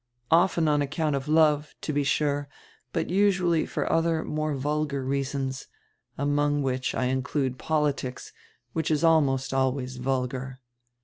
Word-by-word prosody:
Often 170 -1 +4
on 150 -1 +3
account 150 +1 -1
of 135 +1 -4
love, 150 -1 +3
to 155 - -3
be 145 0 +1
sure, 145 0 0 0.4
but 165 -1 -2
usually 185 -4 +2
for - - -2
other, 165 -1 +1
more 155 -1 -2
vulgar 140 0 -1
reasons, 135 -1 -2 0.5
among 145 +1 +1
which 130 -1 -1
I 130 - 0
include 130 0 -1
politics, 145 -5 -1 0.4
which 160 -1 -1
is 155 0 +1
almost 140 -6 +3
always 130 -1 0
vulgar. 130 0 -2
145 Hz, 135 wpm, -26 LUFS, 135-155 Hz, 0.5 s, Often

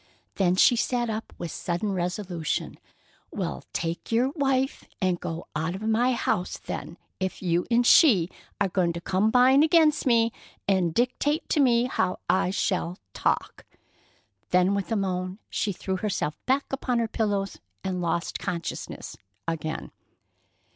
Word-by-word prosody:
Then 180 -2 +2
she 240 - +6
sat 240 0 0
up 220 +1 -5
with 170 -2 -5
sudden 175 +4 -2
resolution. 180 -2 -2 0.5
"Well, - - -4
take 170 +4 -3
your 240 +3 +3
wife 270 -2 0 0.2
and 185 -3 +1
go 170 -1 -5
out 160 +3 -1
of 195 - -7
my 230 +4 +2
house, 180 -6 -1
then, 170 - -6 0.2
if 190 0 -3
you 175 0 +1
and 240 0 +3
she 220 - +6 0.3
are 200 - +3
going 180 -2 +1
to 170 - -4
combine 250 +9 +4
against 310 -2 +4
me, 230 -1 +4 0.4
and 190 -4 +2
dictate 255 - 0
to 305 - +2
me 240 -4 +4
how 185 -7 0
I 190 -1 +2
shall 185 -2 -1 0.2
talk!" - - -1 0.9
Then 180 +2 +3
with 200 +2 -2
a - - +2
moan 185 -2 -2
she 210 - 0
threw 190 0 -3
herself 185 -7 -2
back 270 +2 +2
upon 255 -2 -1
her 230 -1 +1
pillows 205 -3 -1 0.2
and 185 -1 -2
lost 170 0 -1
consciousness 170 -4 -5 0.3
again. 160 -1 -3
195 Hz, 145 wpm, -26 LUFS, 180-240 Hz, 0.9 s, she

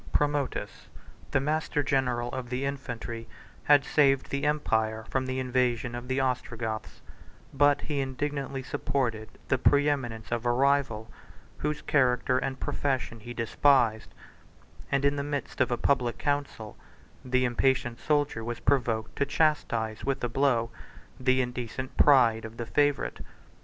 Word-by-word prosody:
Promotus, 145 -2 -1 0.4
the - - +2
master 150 +1 0
general 125 -3 0
of 130 -2 -5
the 130 +2 -2
infantry, 120 -4 -5 0.4
had 145 -2 +5
saved 135 -3 +3
the 140 +1 -1
empire 110 -7 0
from 130 -1 0
the 130 0 -2
invasion 125 -2 0
of 120 +1 -6
the 130 +1 0
Ostrogoths; 115 -4 -3 0.5
but 145 +1 +4
he 145 -2 -2
indignantly 135 0 -3
supported 120 -5 -2 0.2
the 130 - +2
preeminence 135 -7 +1
of 120 -1 -1
a 120 - +2
rival, 130 -4 +1 0.5
whose 150 0 -2
character 125 -2 +2
and 130 -1 -3
profession 130 -4 -2
he 120 +3 -9
despised; 115 -1 +2 0.8
and 140 0 +2
in 140 0 +2
the 140 - -1
midst 145 -2 -3
of 130 - +3
a 120 - 0
public 125 -2 +1
council, 145 -7 -2 0.5
the 130 0 +1
impatient 120 -1 +1
soldier 145 -6 0
was 120 +1 -4
provoked 120 -5 0
to 140 - +2
chastise 115 -8 0
with 135 -2 -2
a 120 - 0
blow 120 -3 +1 0.5
the 130 0 +3
indecent 125 +1 -5
pride 120 -6 +5
of 110 +1 -9
the 115 - -4
favorite. 145 +2 +1
130 Hz, 140 wpm, -28 LUFS, 120-140 Hz, 0.8 s, had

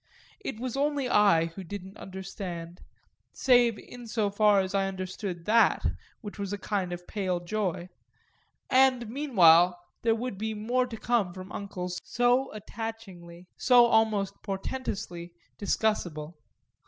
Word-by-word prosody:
It 270 - -6
was 255 0 -4
only 285 -1 0
I 200 -8 +4
who 195 - -7
didn't 195 +2 -8
understand 185 -2 -7 0.5
save 245 -4 +4
in 245 +2 -11
so 215 -2 0
far 205 0 +4
as 190 0 -4
I 195 -1 +1
understood 185 -2 -5
that, 225 +2 +4 0.4
which 205 -3 -9
was 200 -1 -3
a 205 - -2
kind 195 -3 -2
of 175 0 -6
pale 185 -3 -2
joy; 180 -1 -2 0.8
and 255 -2 +4
meanwhile 180 - +5 0.2
there 225 -1 +2
would 230 -4 -5
be 220 0 -2
more 245 +4 0
to 230 -2 -7
come 215 -6 0
from 185 +1 -9
uncles 180 -3 -5
so 245 +2 +2
attachingly, 200 -5 -8
so 245 -2 +6
almost 220 -4 +2
portentously, 195 -5 -5 0.2
discussable. 175 -7 -1
205 Hz, 135 wpm, -28 LUFS, 180-230 Hz, 0.8 s, so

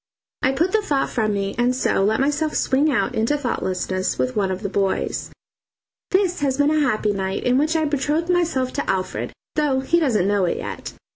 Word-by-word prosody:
I 260 - +3
put 335 +7 +1
the 435 - +2
thought 285 -9 0
from 215 -3 0
me, 195 0 -2
and 245 +1 +2
so 250 - +1
let 215 +2 +2
myself 295 +3 0
swing 285 +4 +2
out 250 - 0
into 230 +7 +1
thoughtlessness 185 -8 -2
with 130 0 -1
one 195 -2 +1
of 190 +2 -4
the - - 0
boys. 195 -1 -1 0.8
This 375 -2 +1
has 270 -2 0
been 290 +1 +3
a 310 - +2
happy 215 -7 +1
night, 190 -1 -2
in 250 +1 +3
which 310 +3 +1
I 315 -1 +2
betrothed 295 +3 0
myself 320 -8 0
to 285 - -3
Alfred, 185 -1 -2 0.2
though 285 -4 +1
he 335 +6 +2
doesn't 230 - +2
know 200 -2 +2
it 175 - -1
yet. - - -6
260 Hz, 205 wpm, -22 LUFS, 200-300 Hz, 0.8 s, I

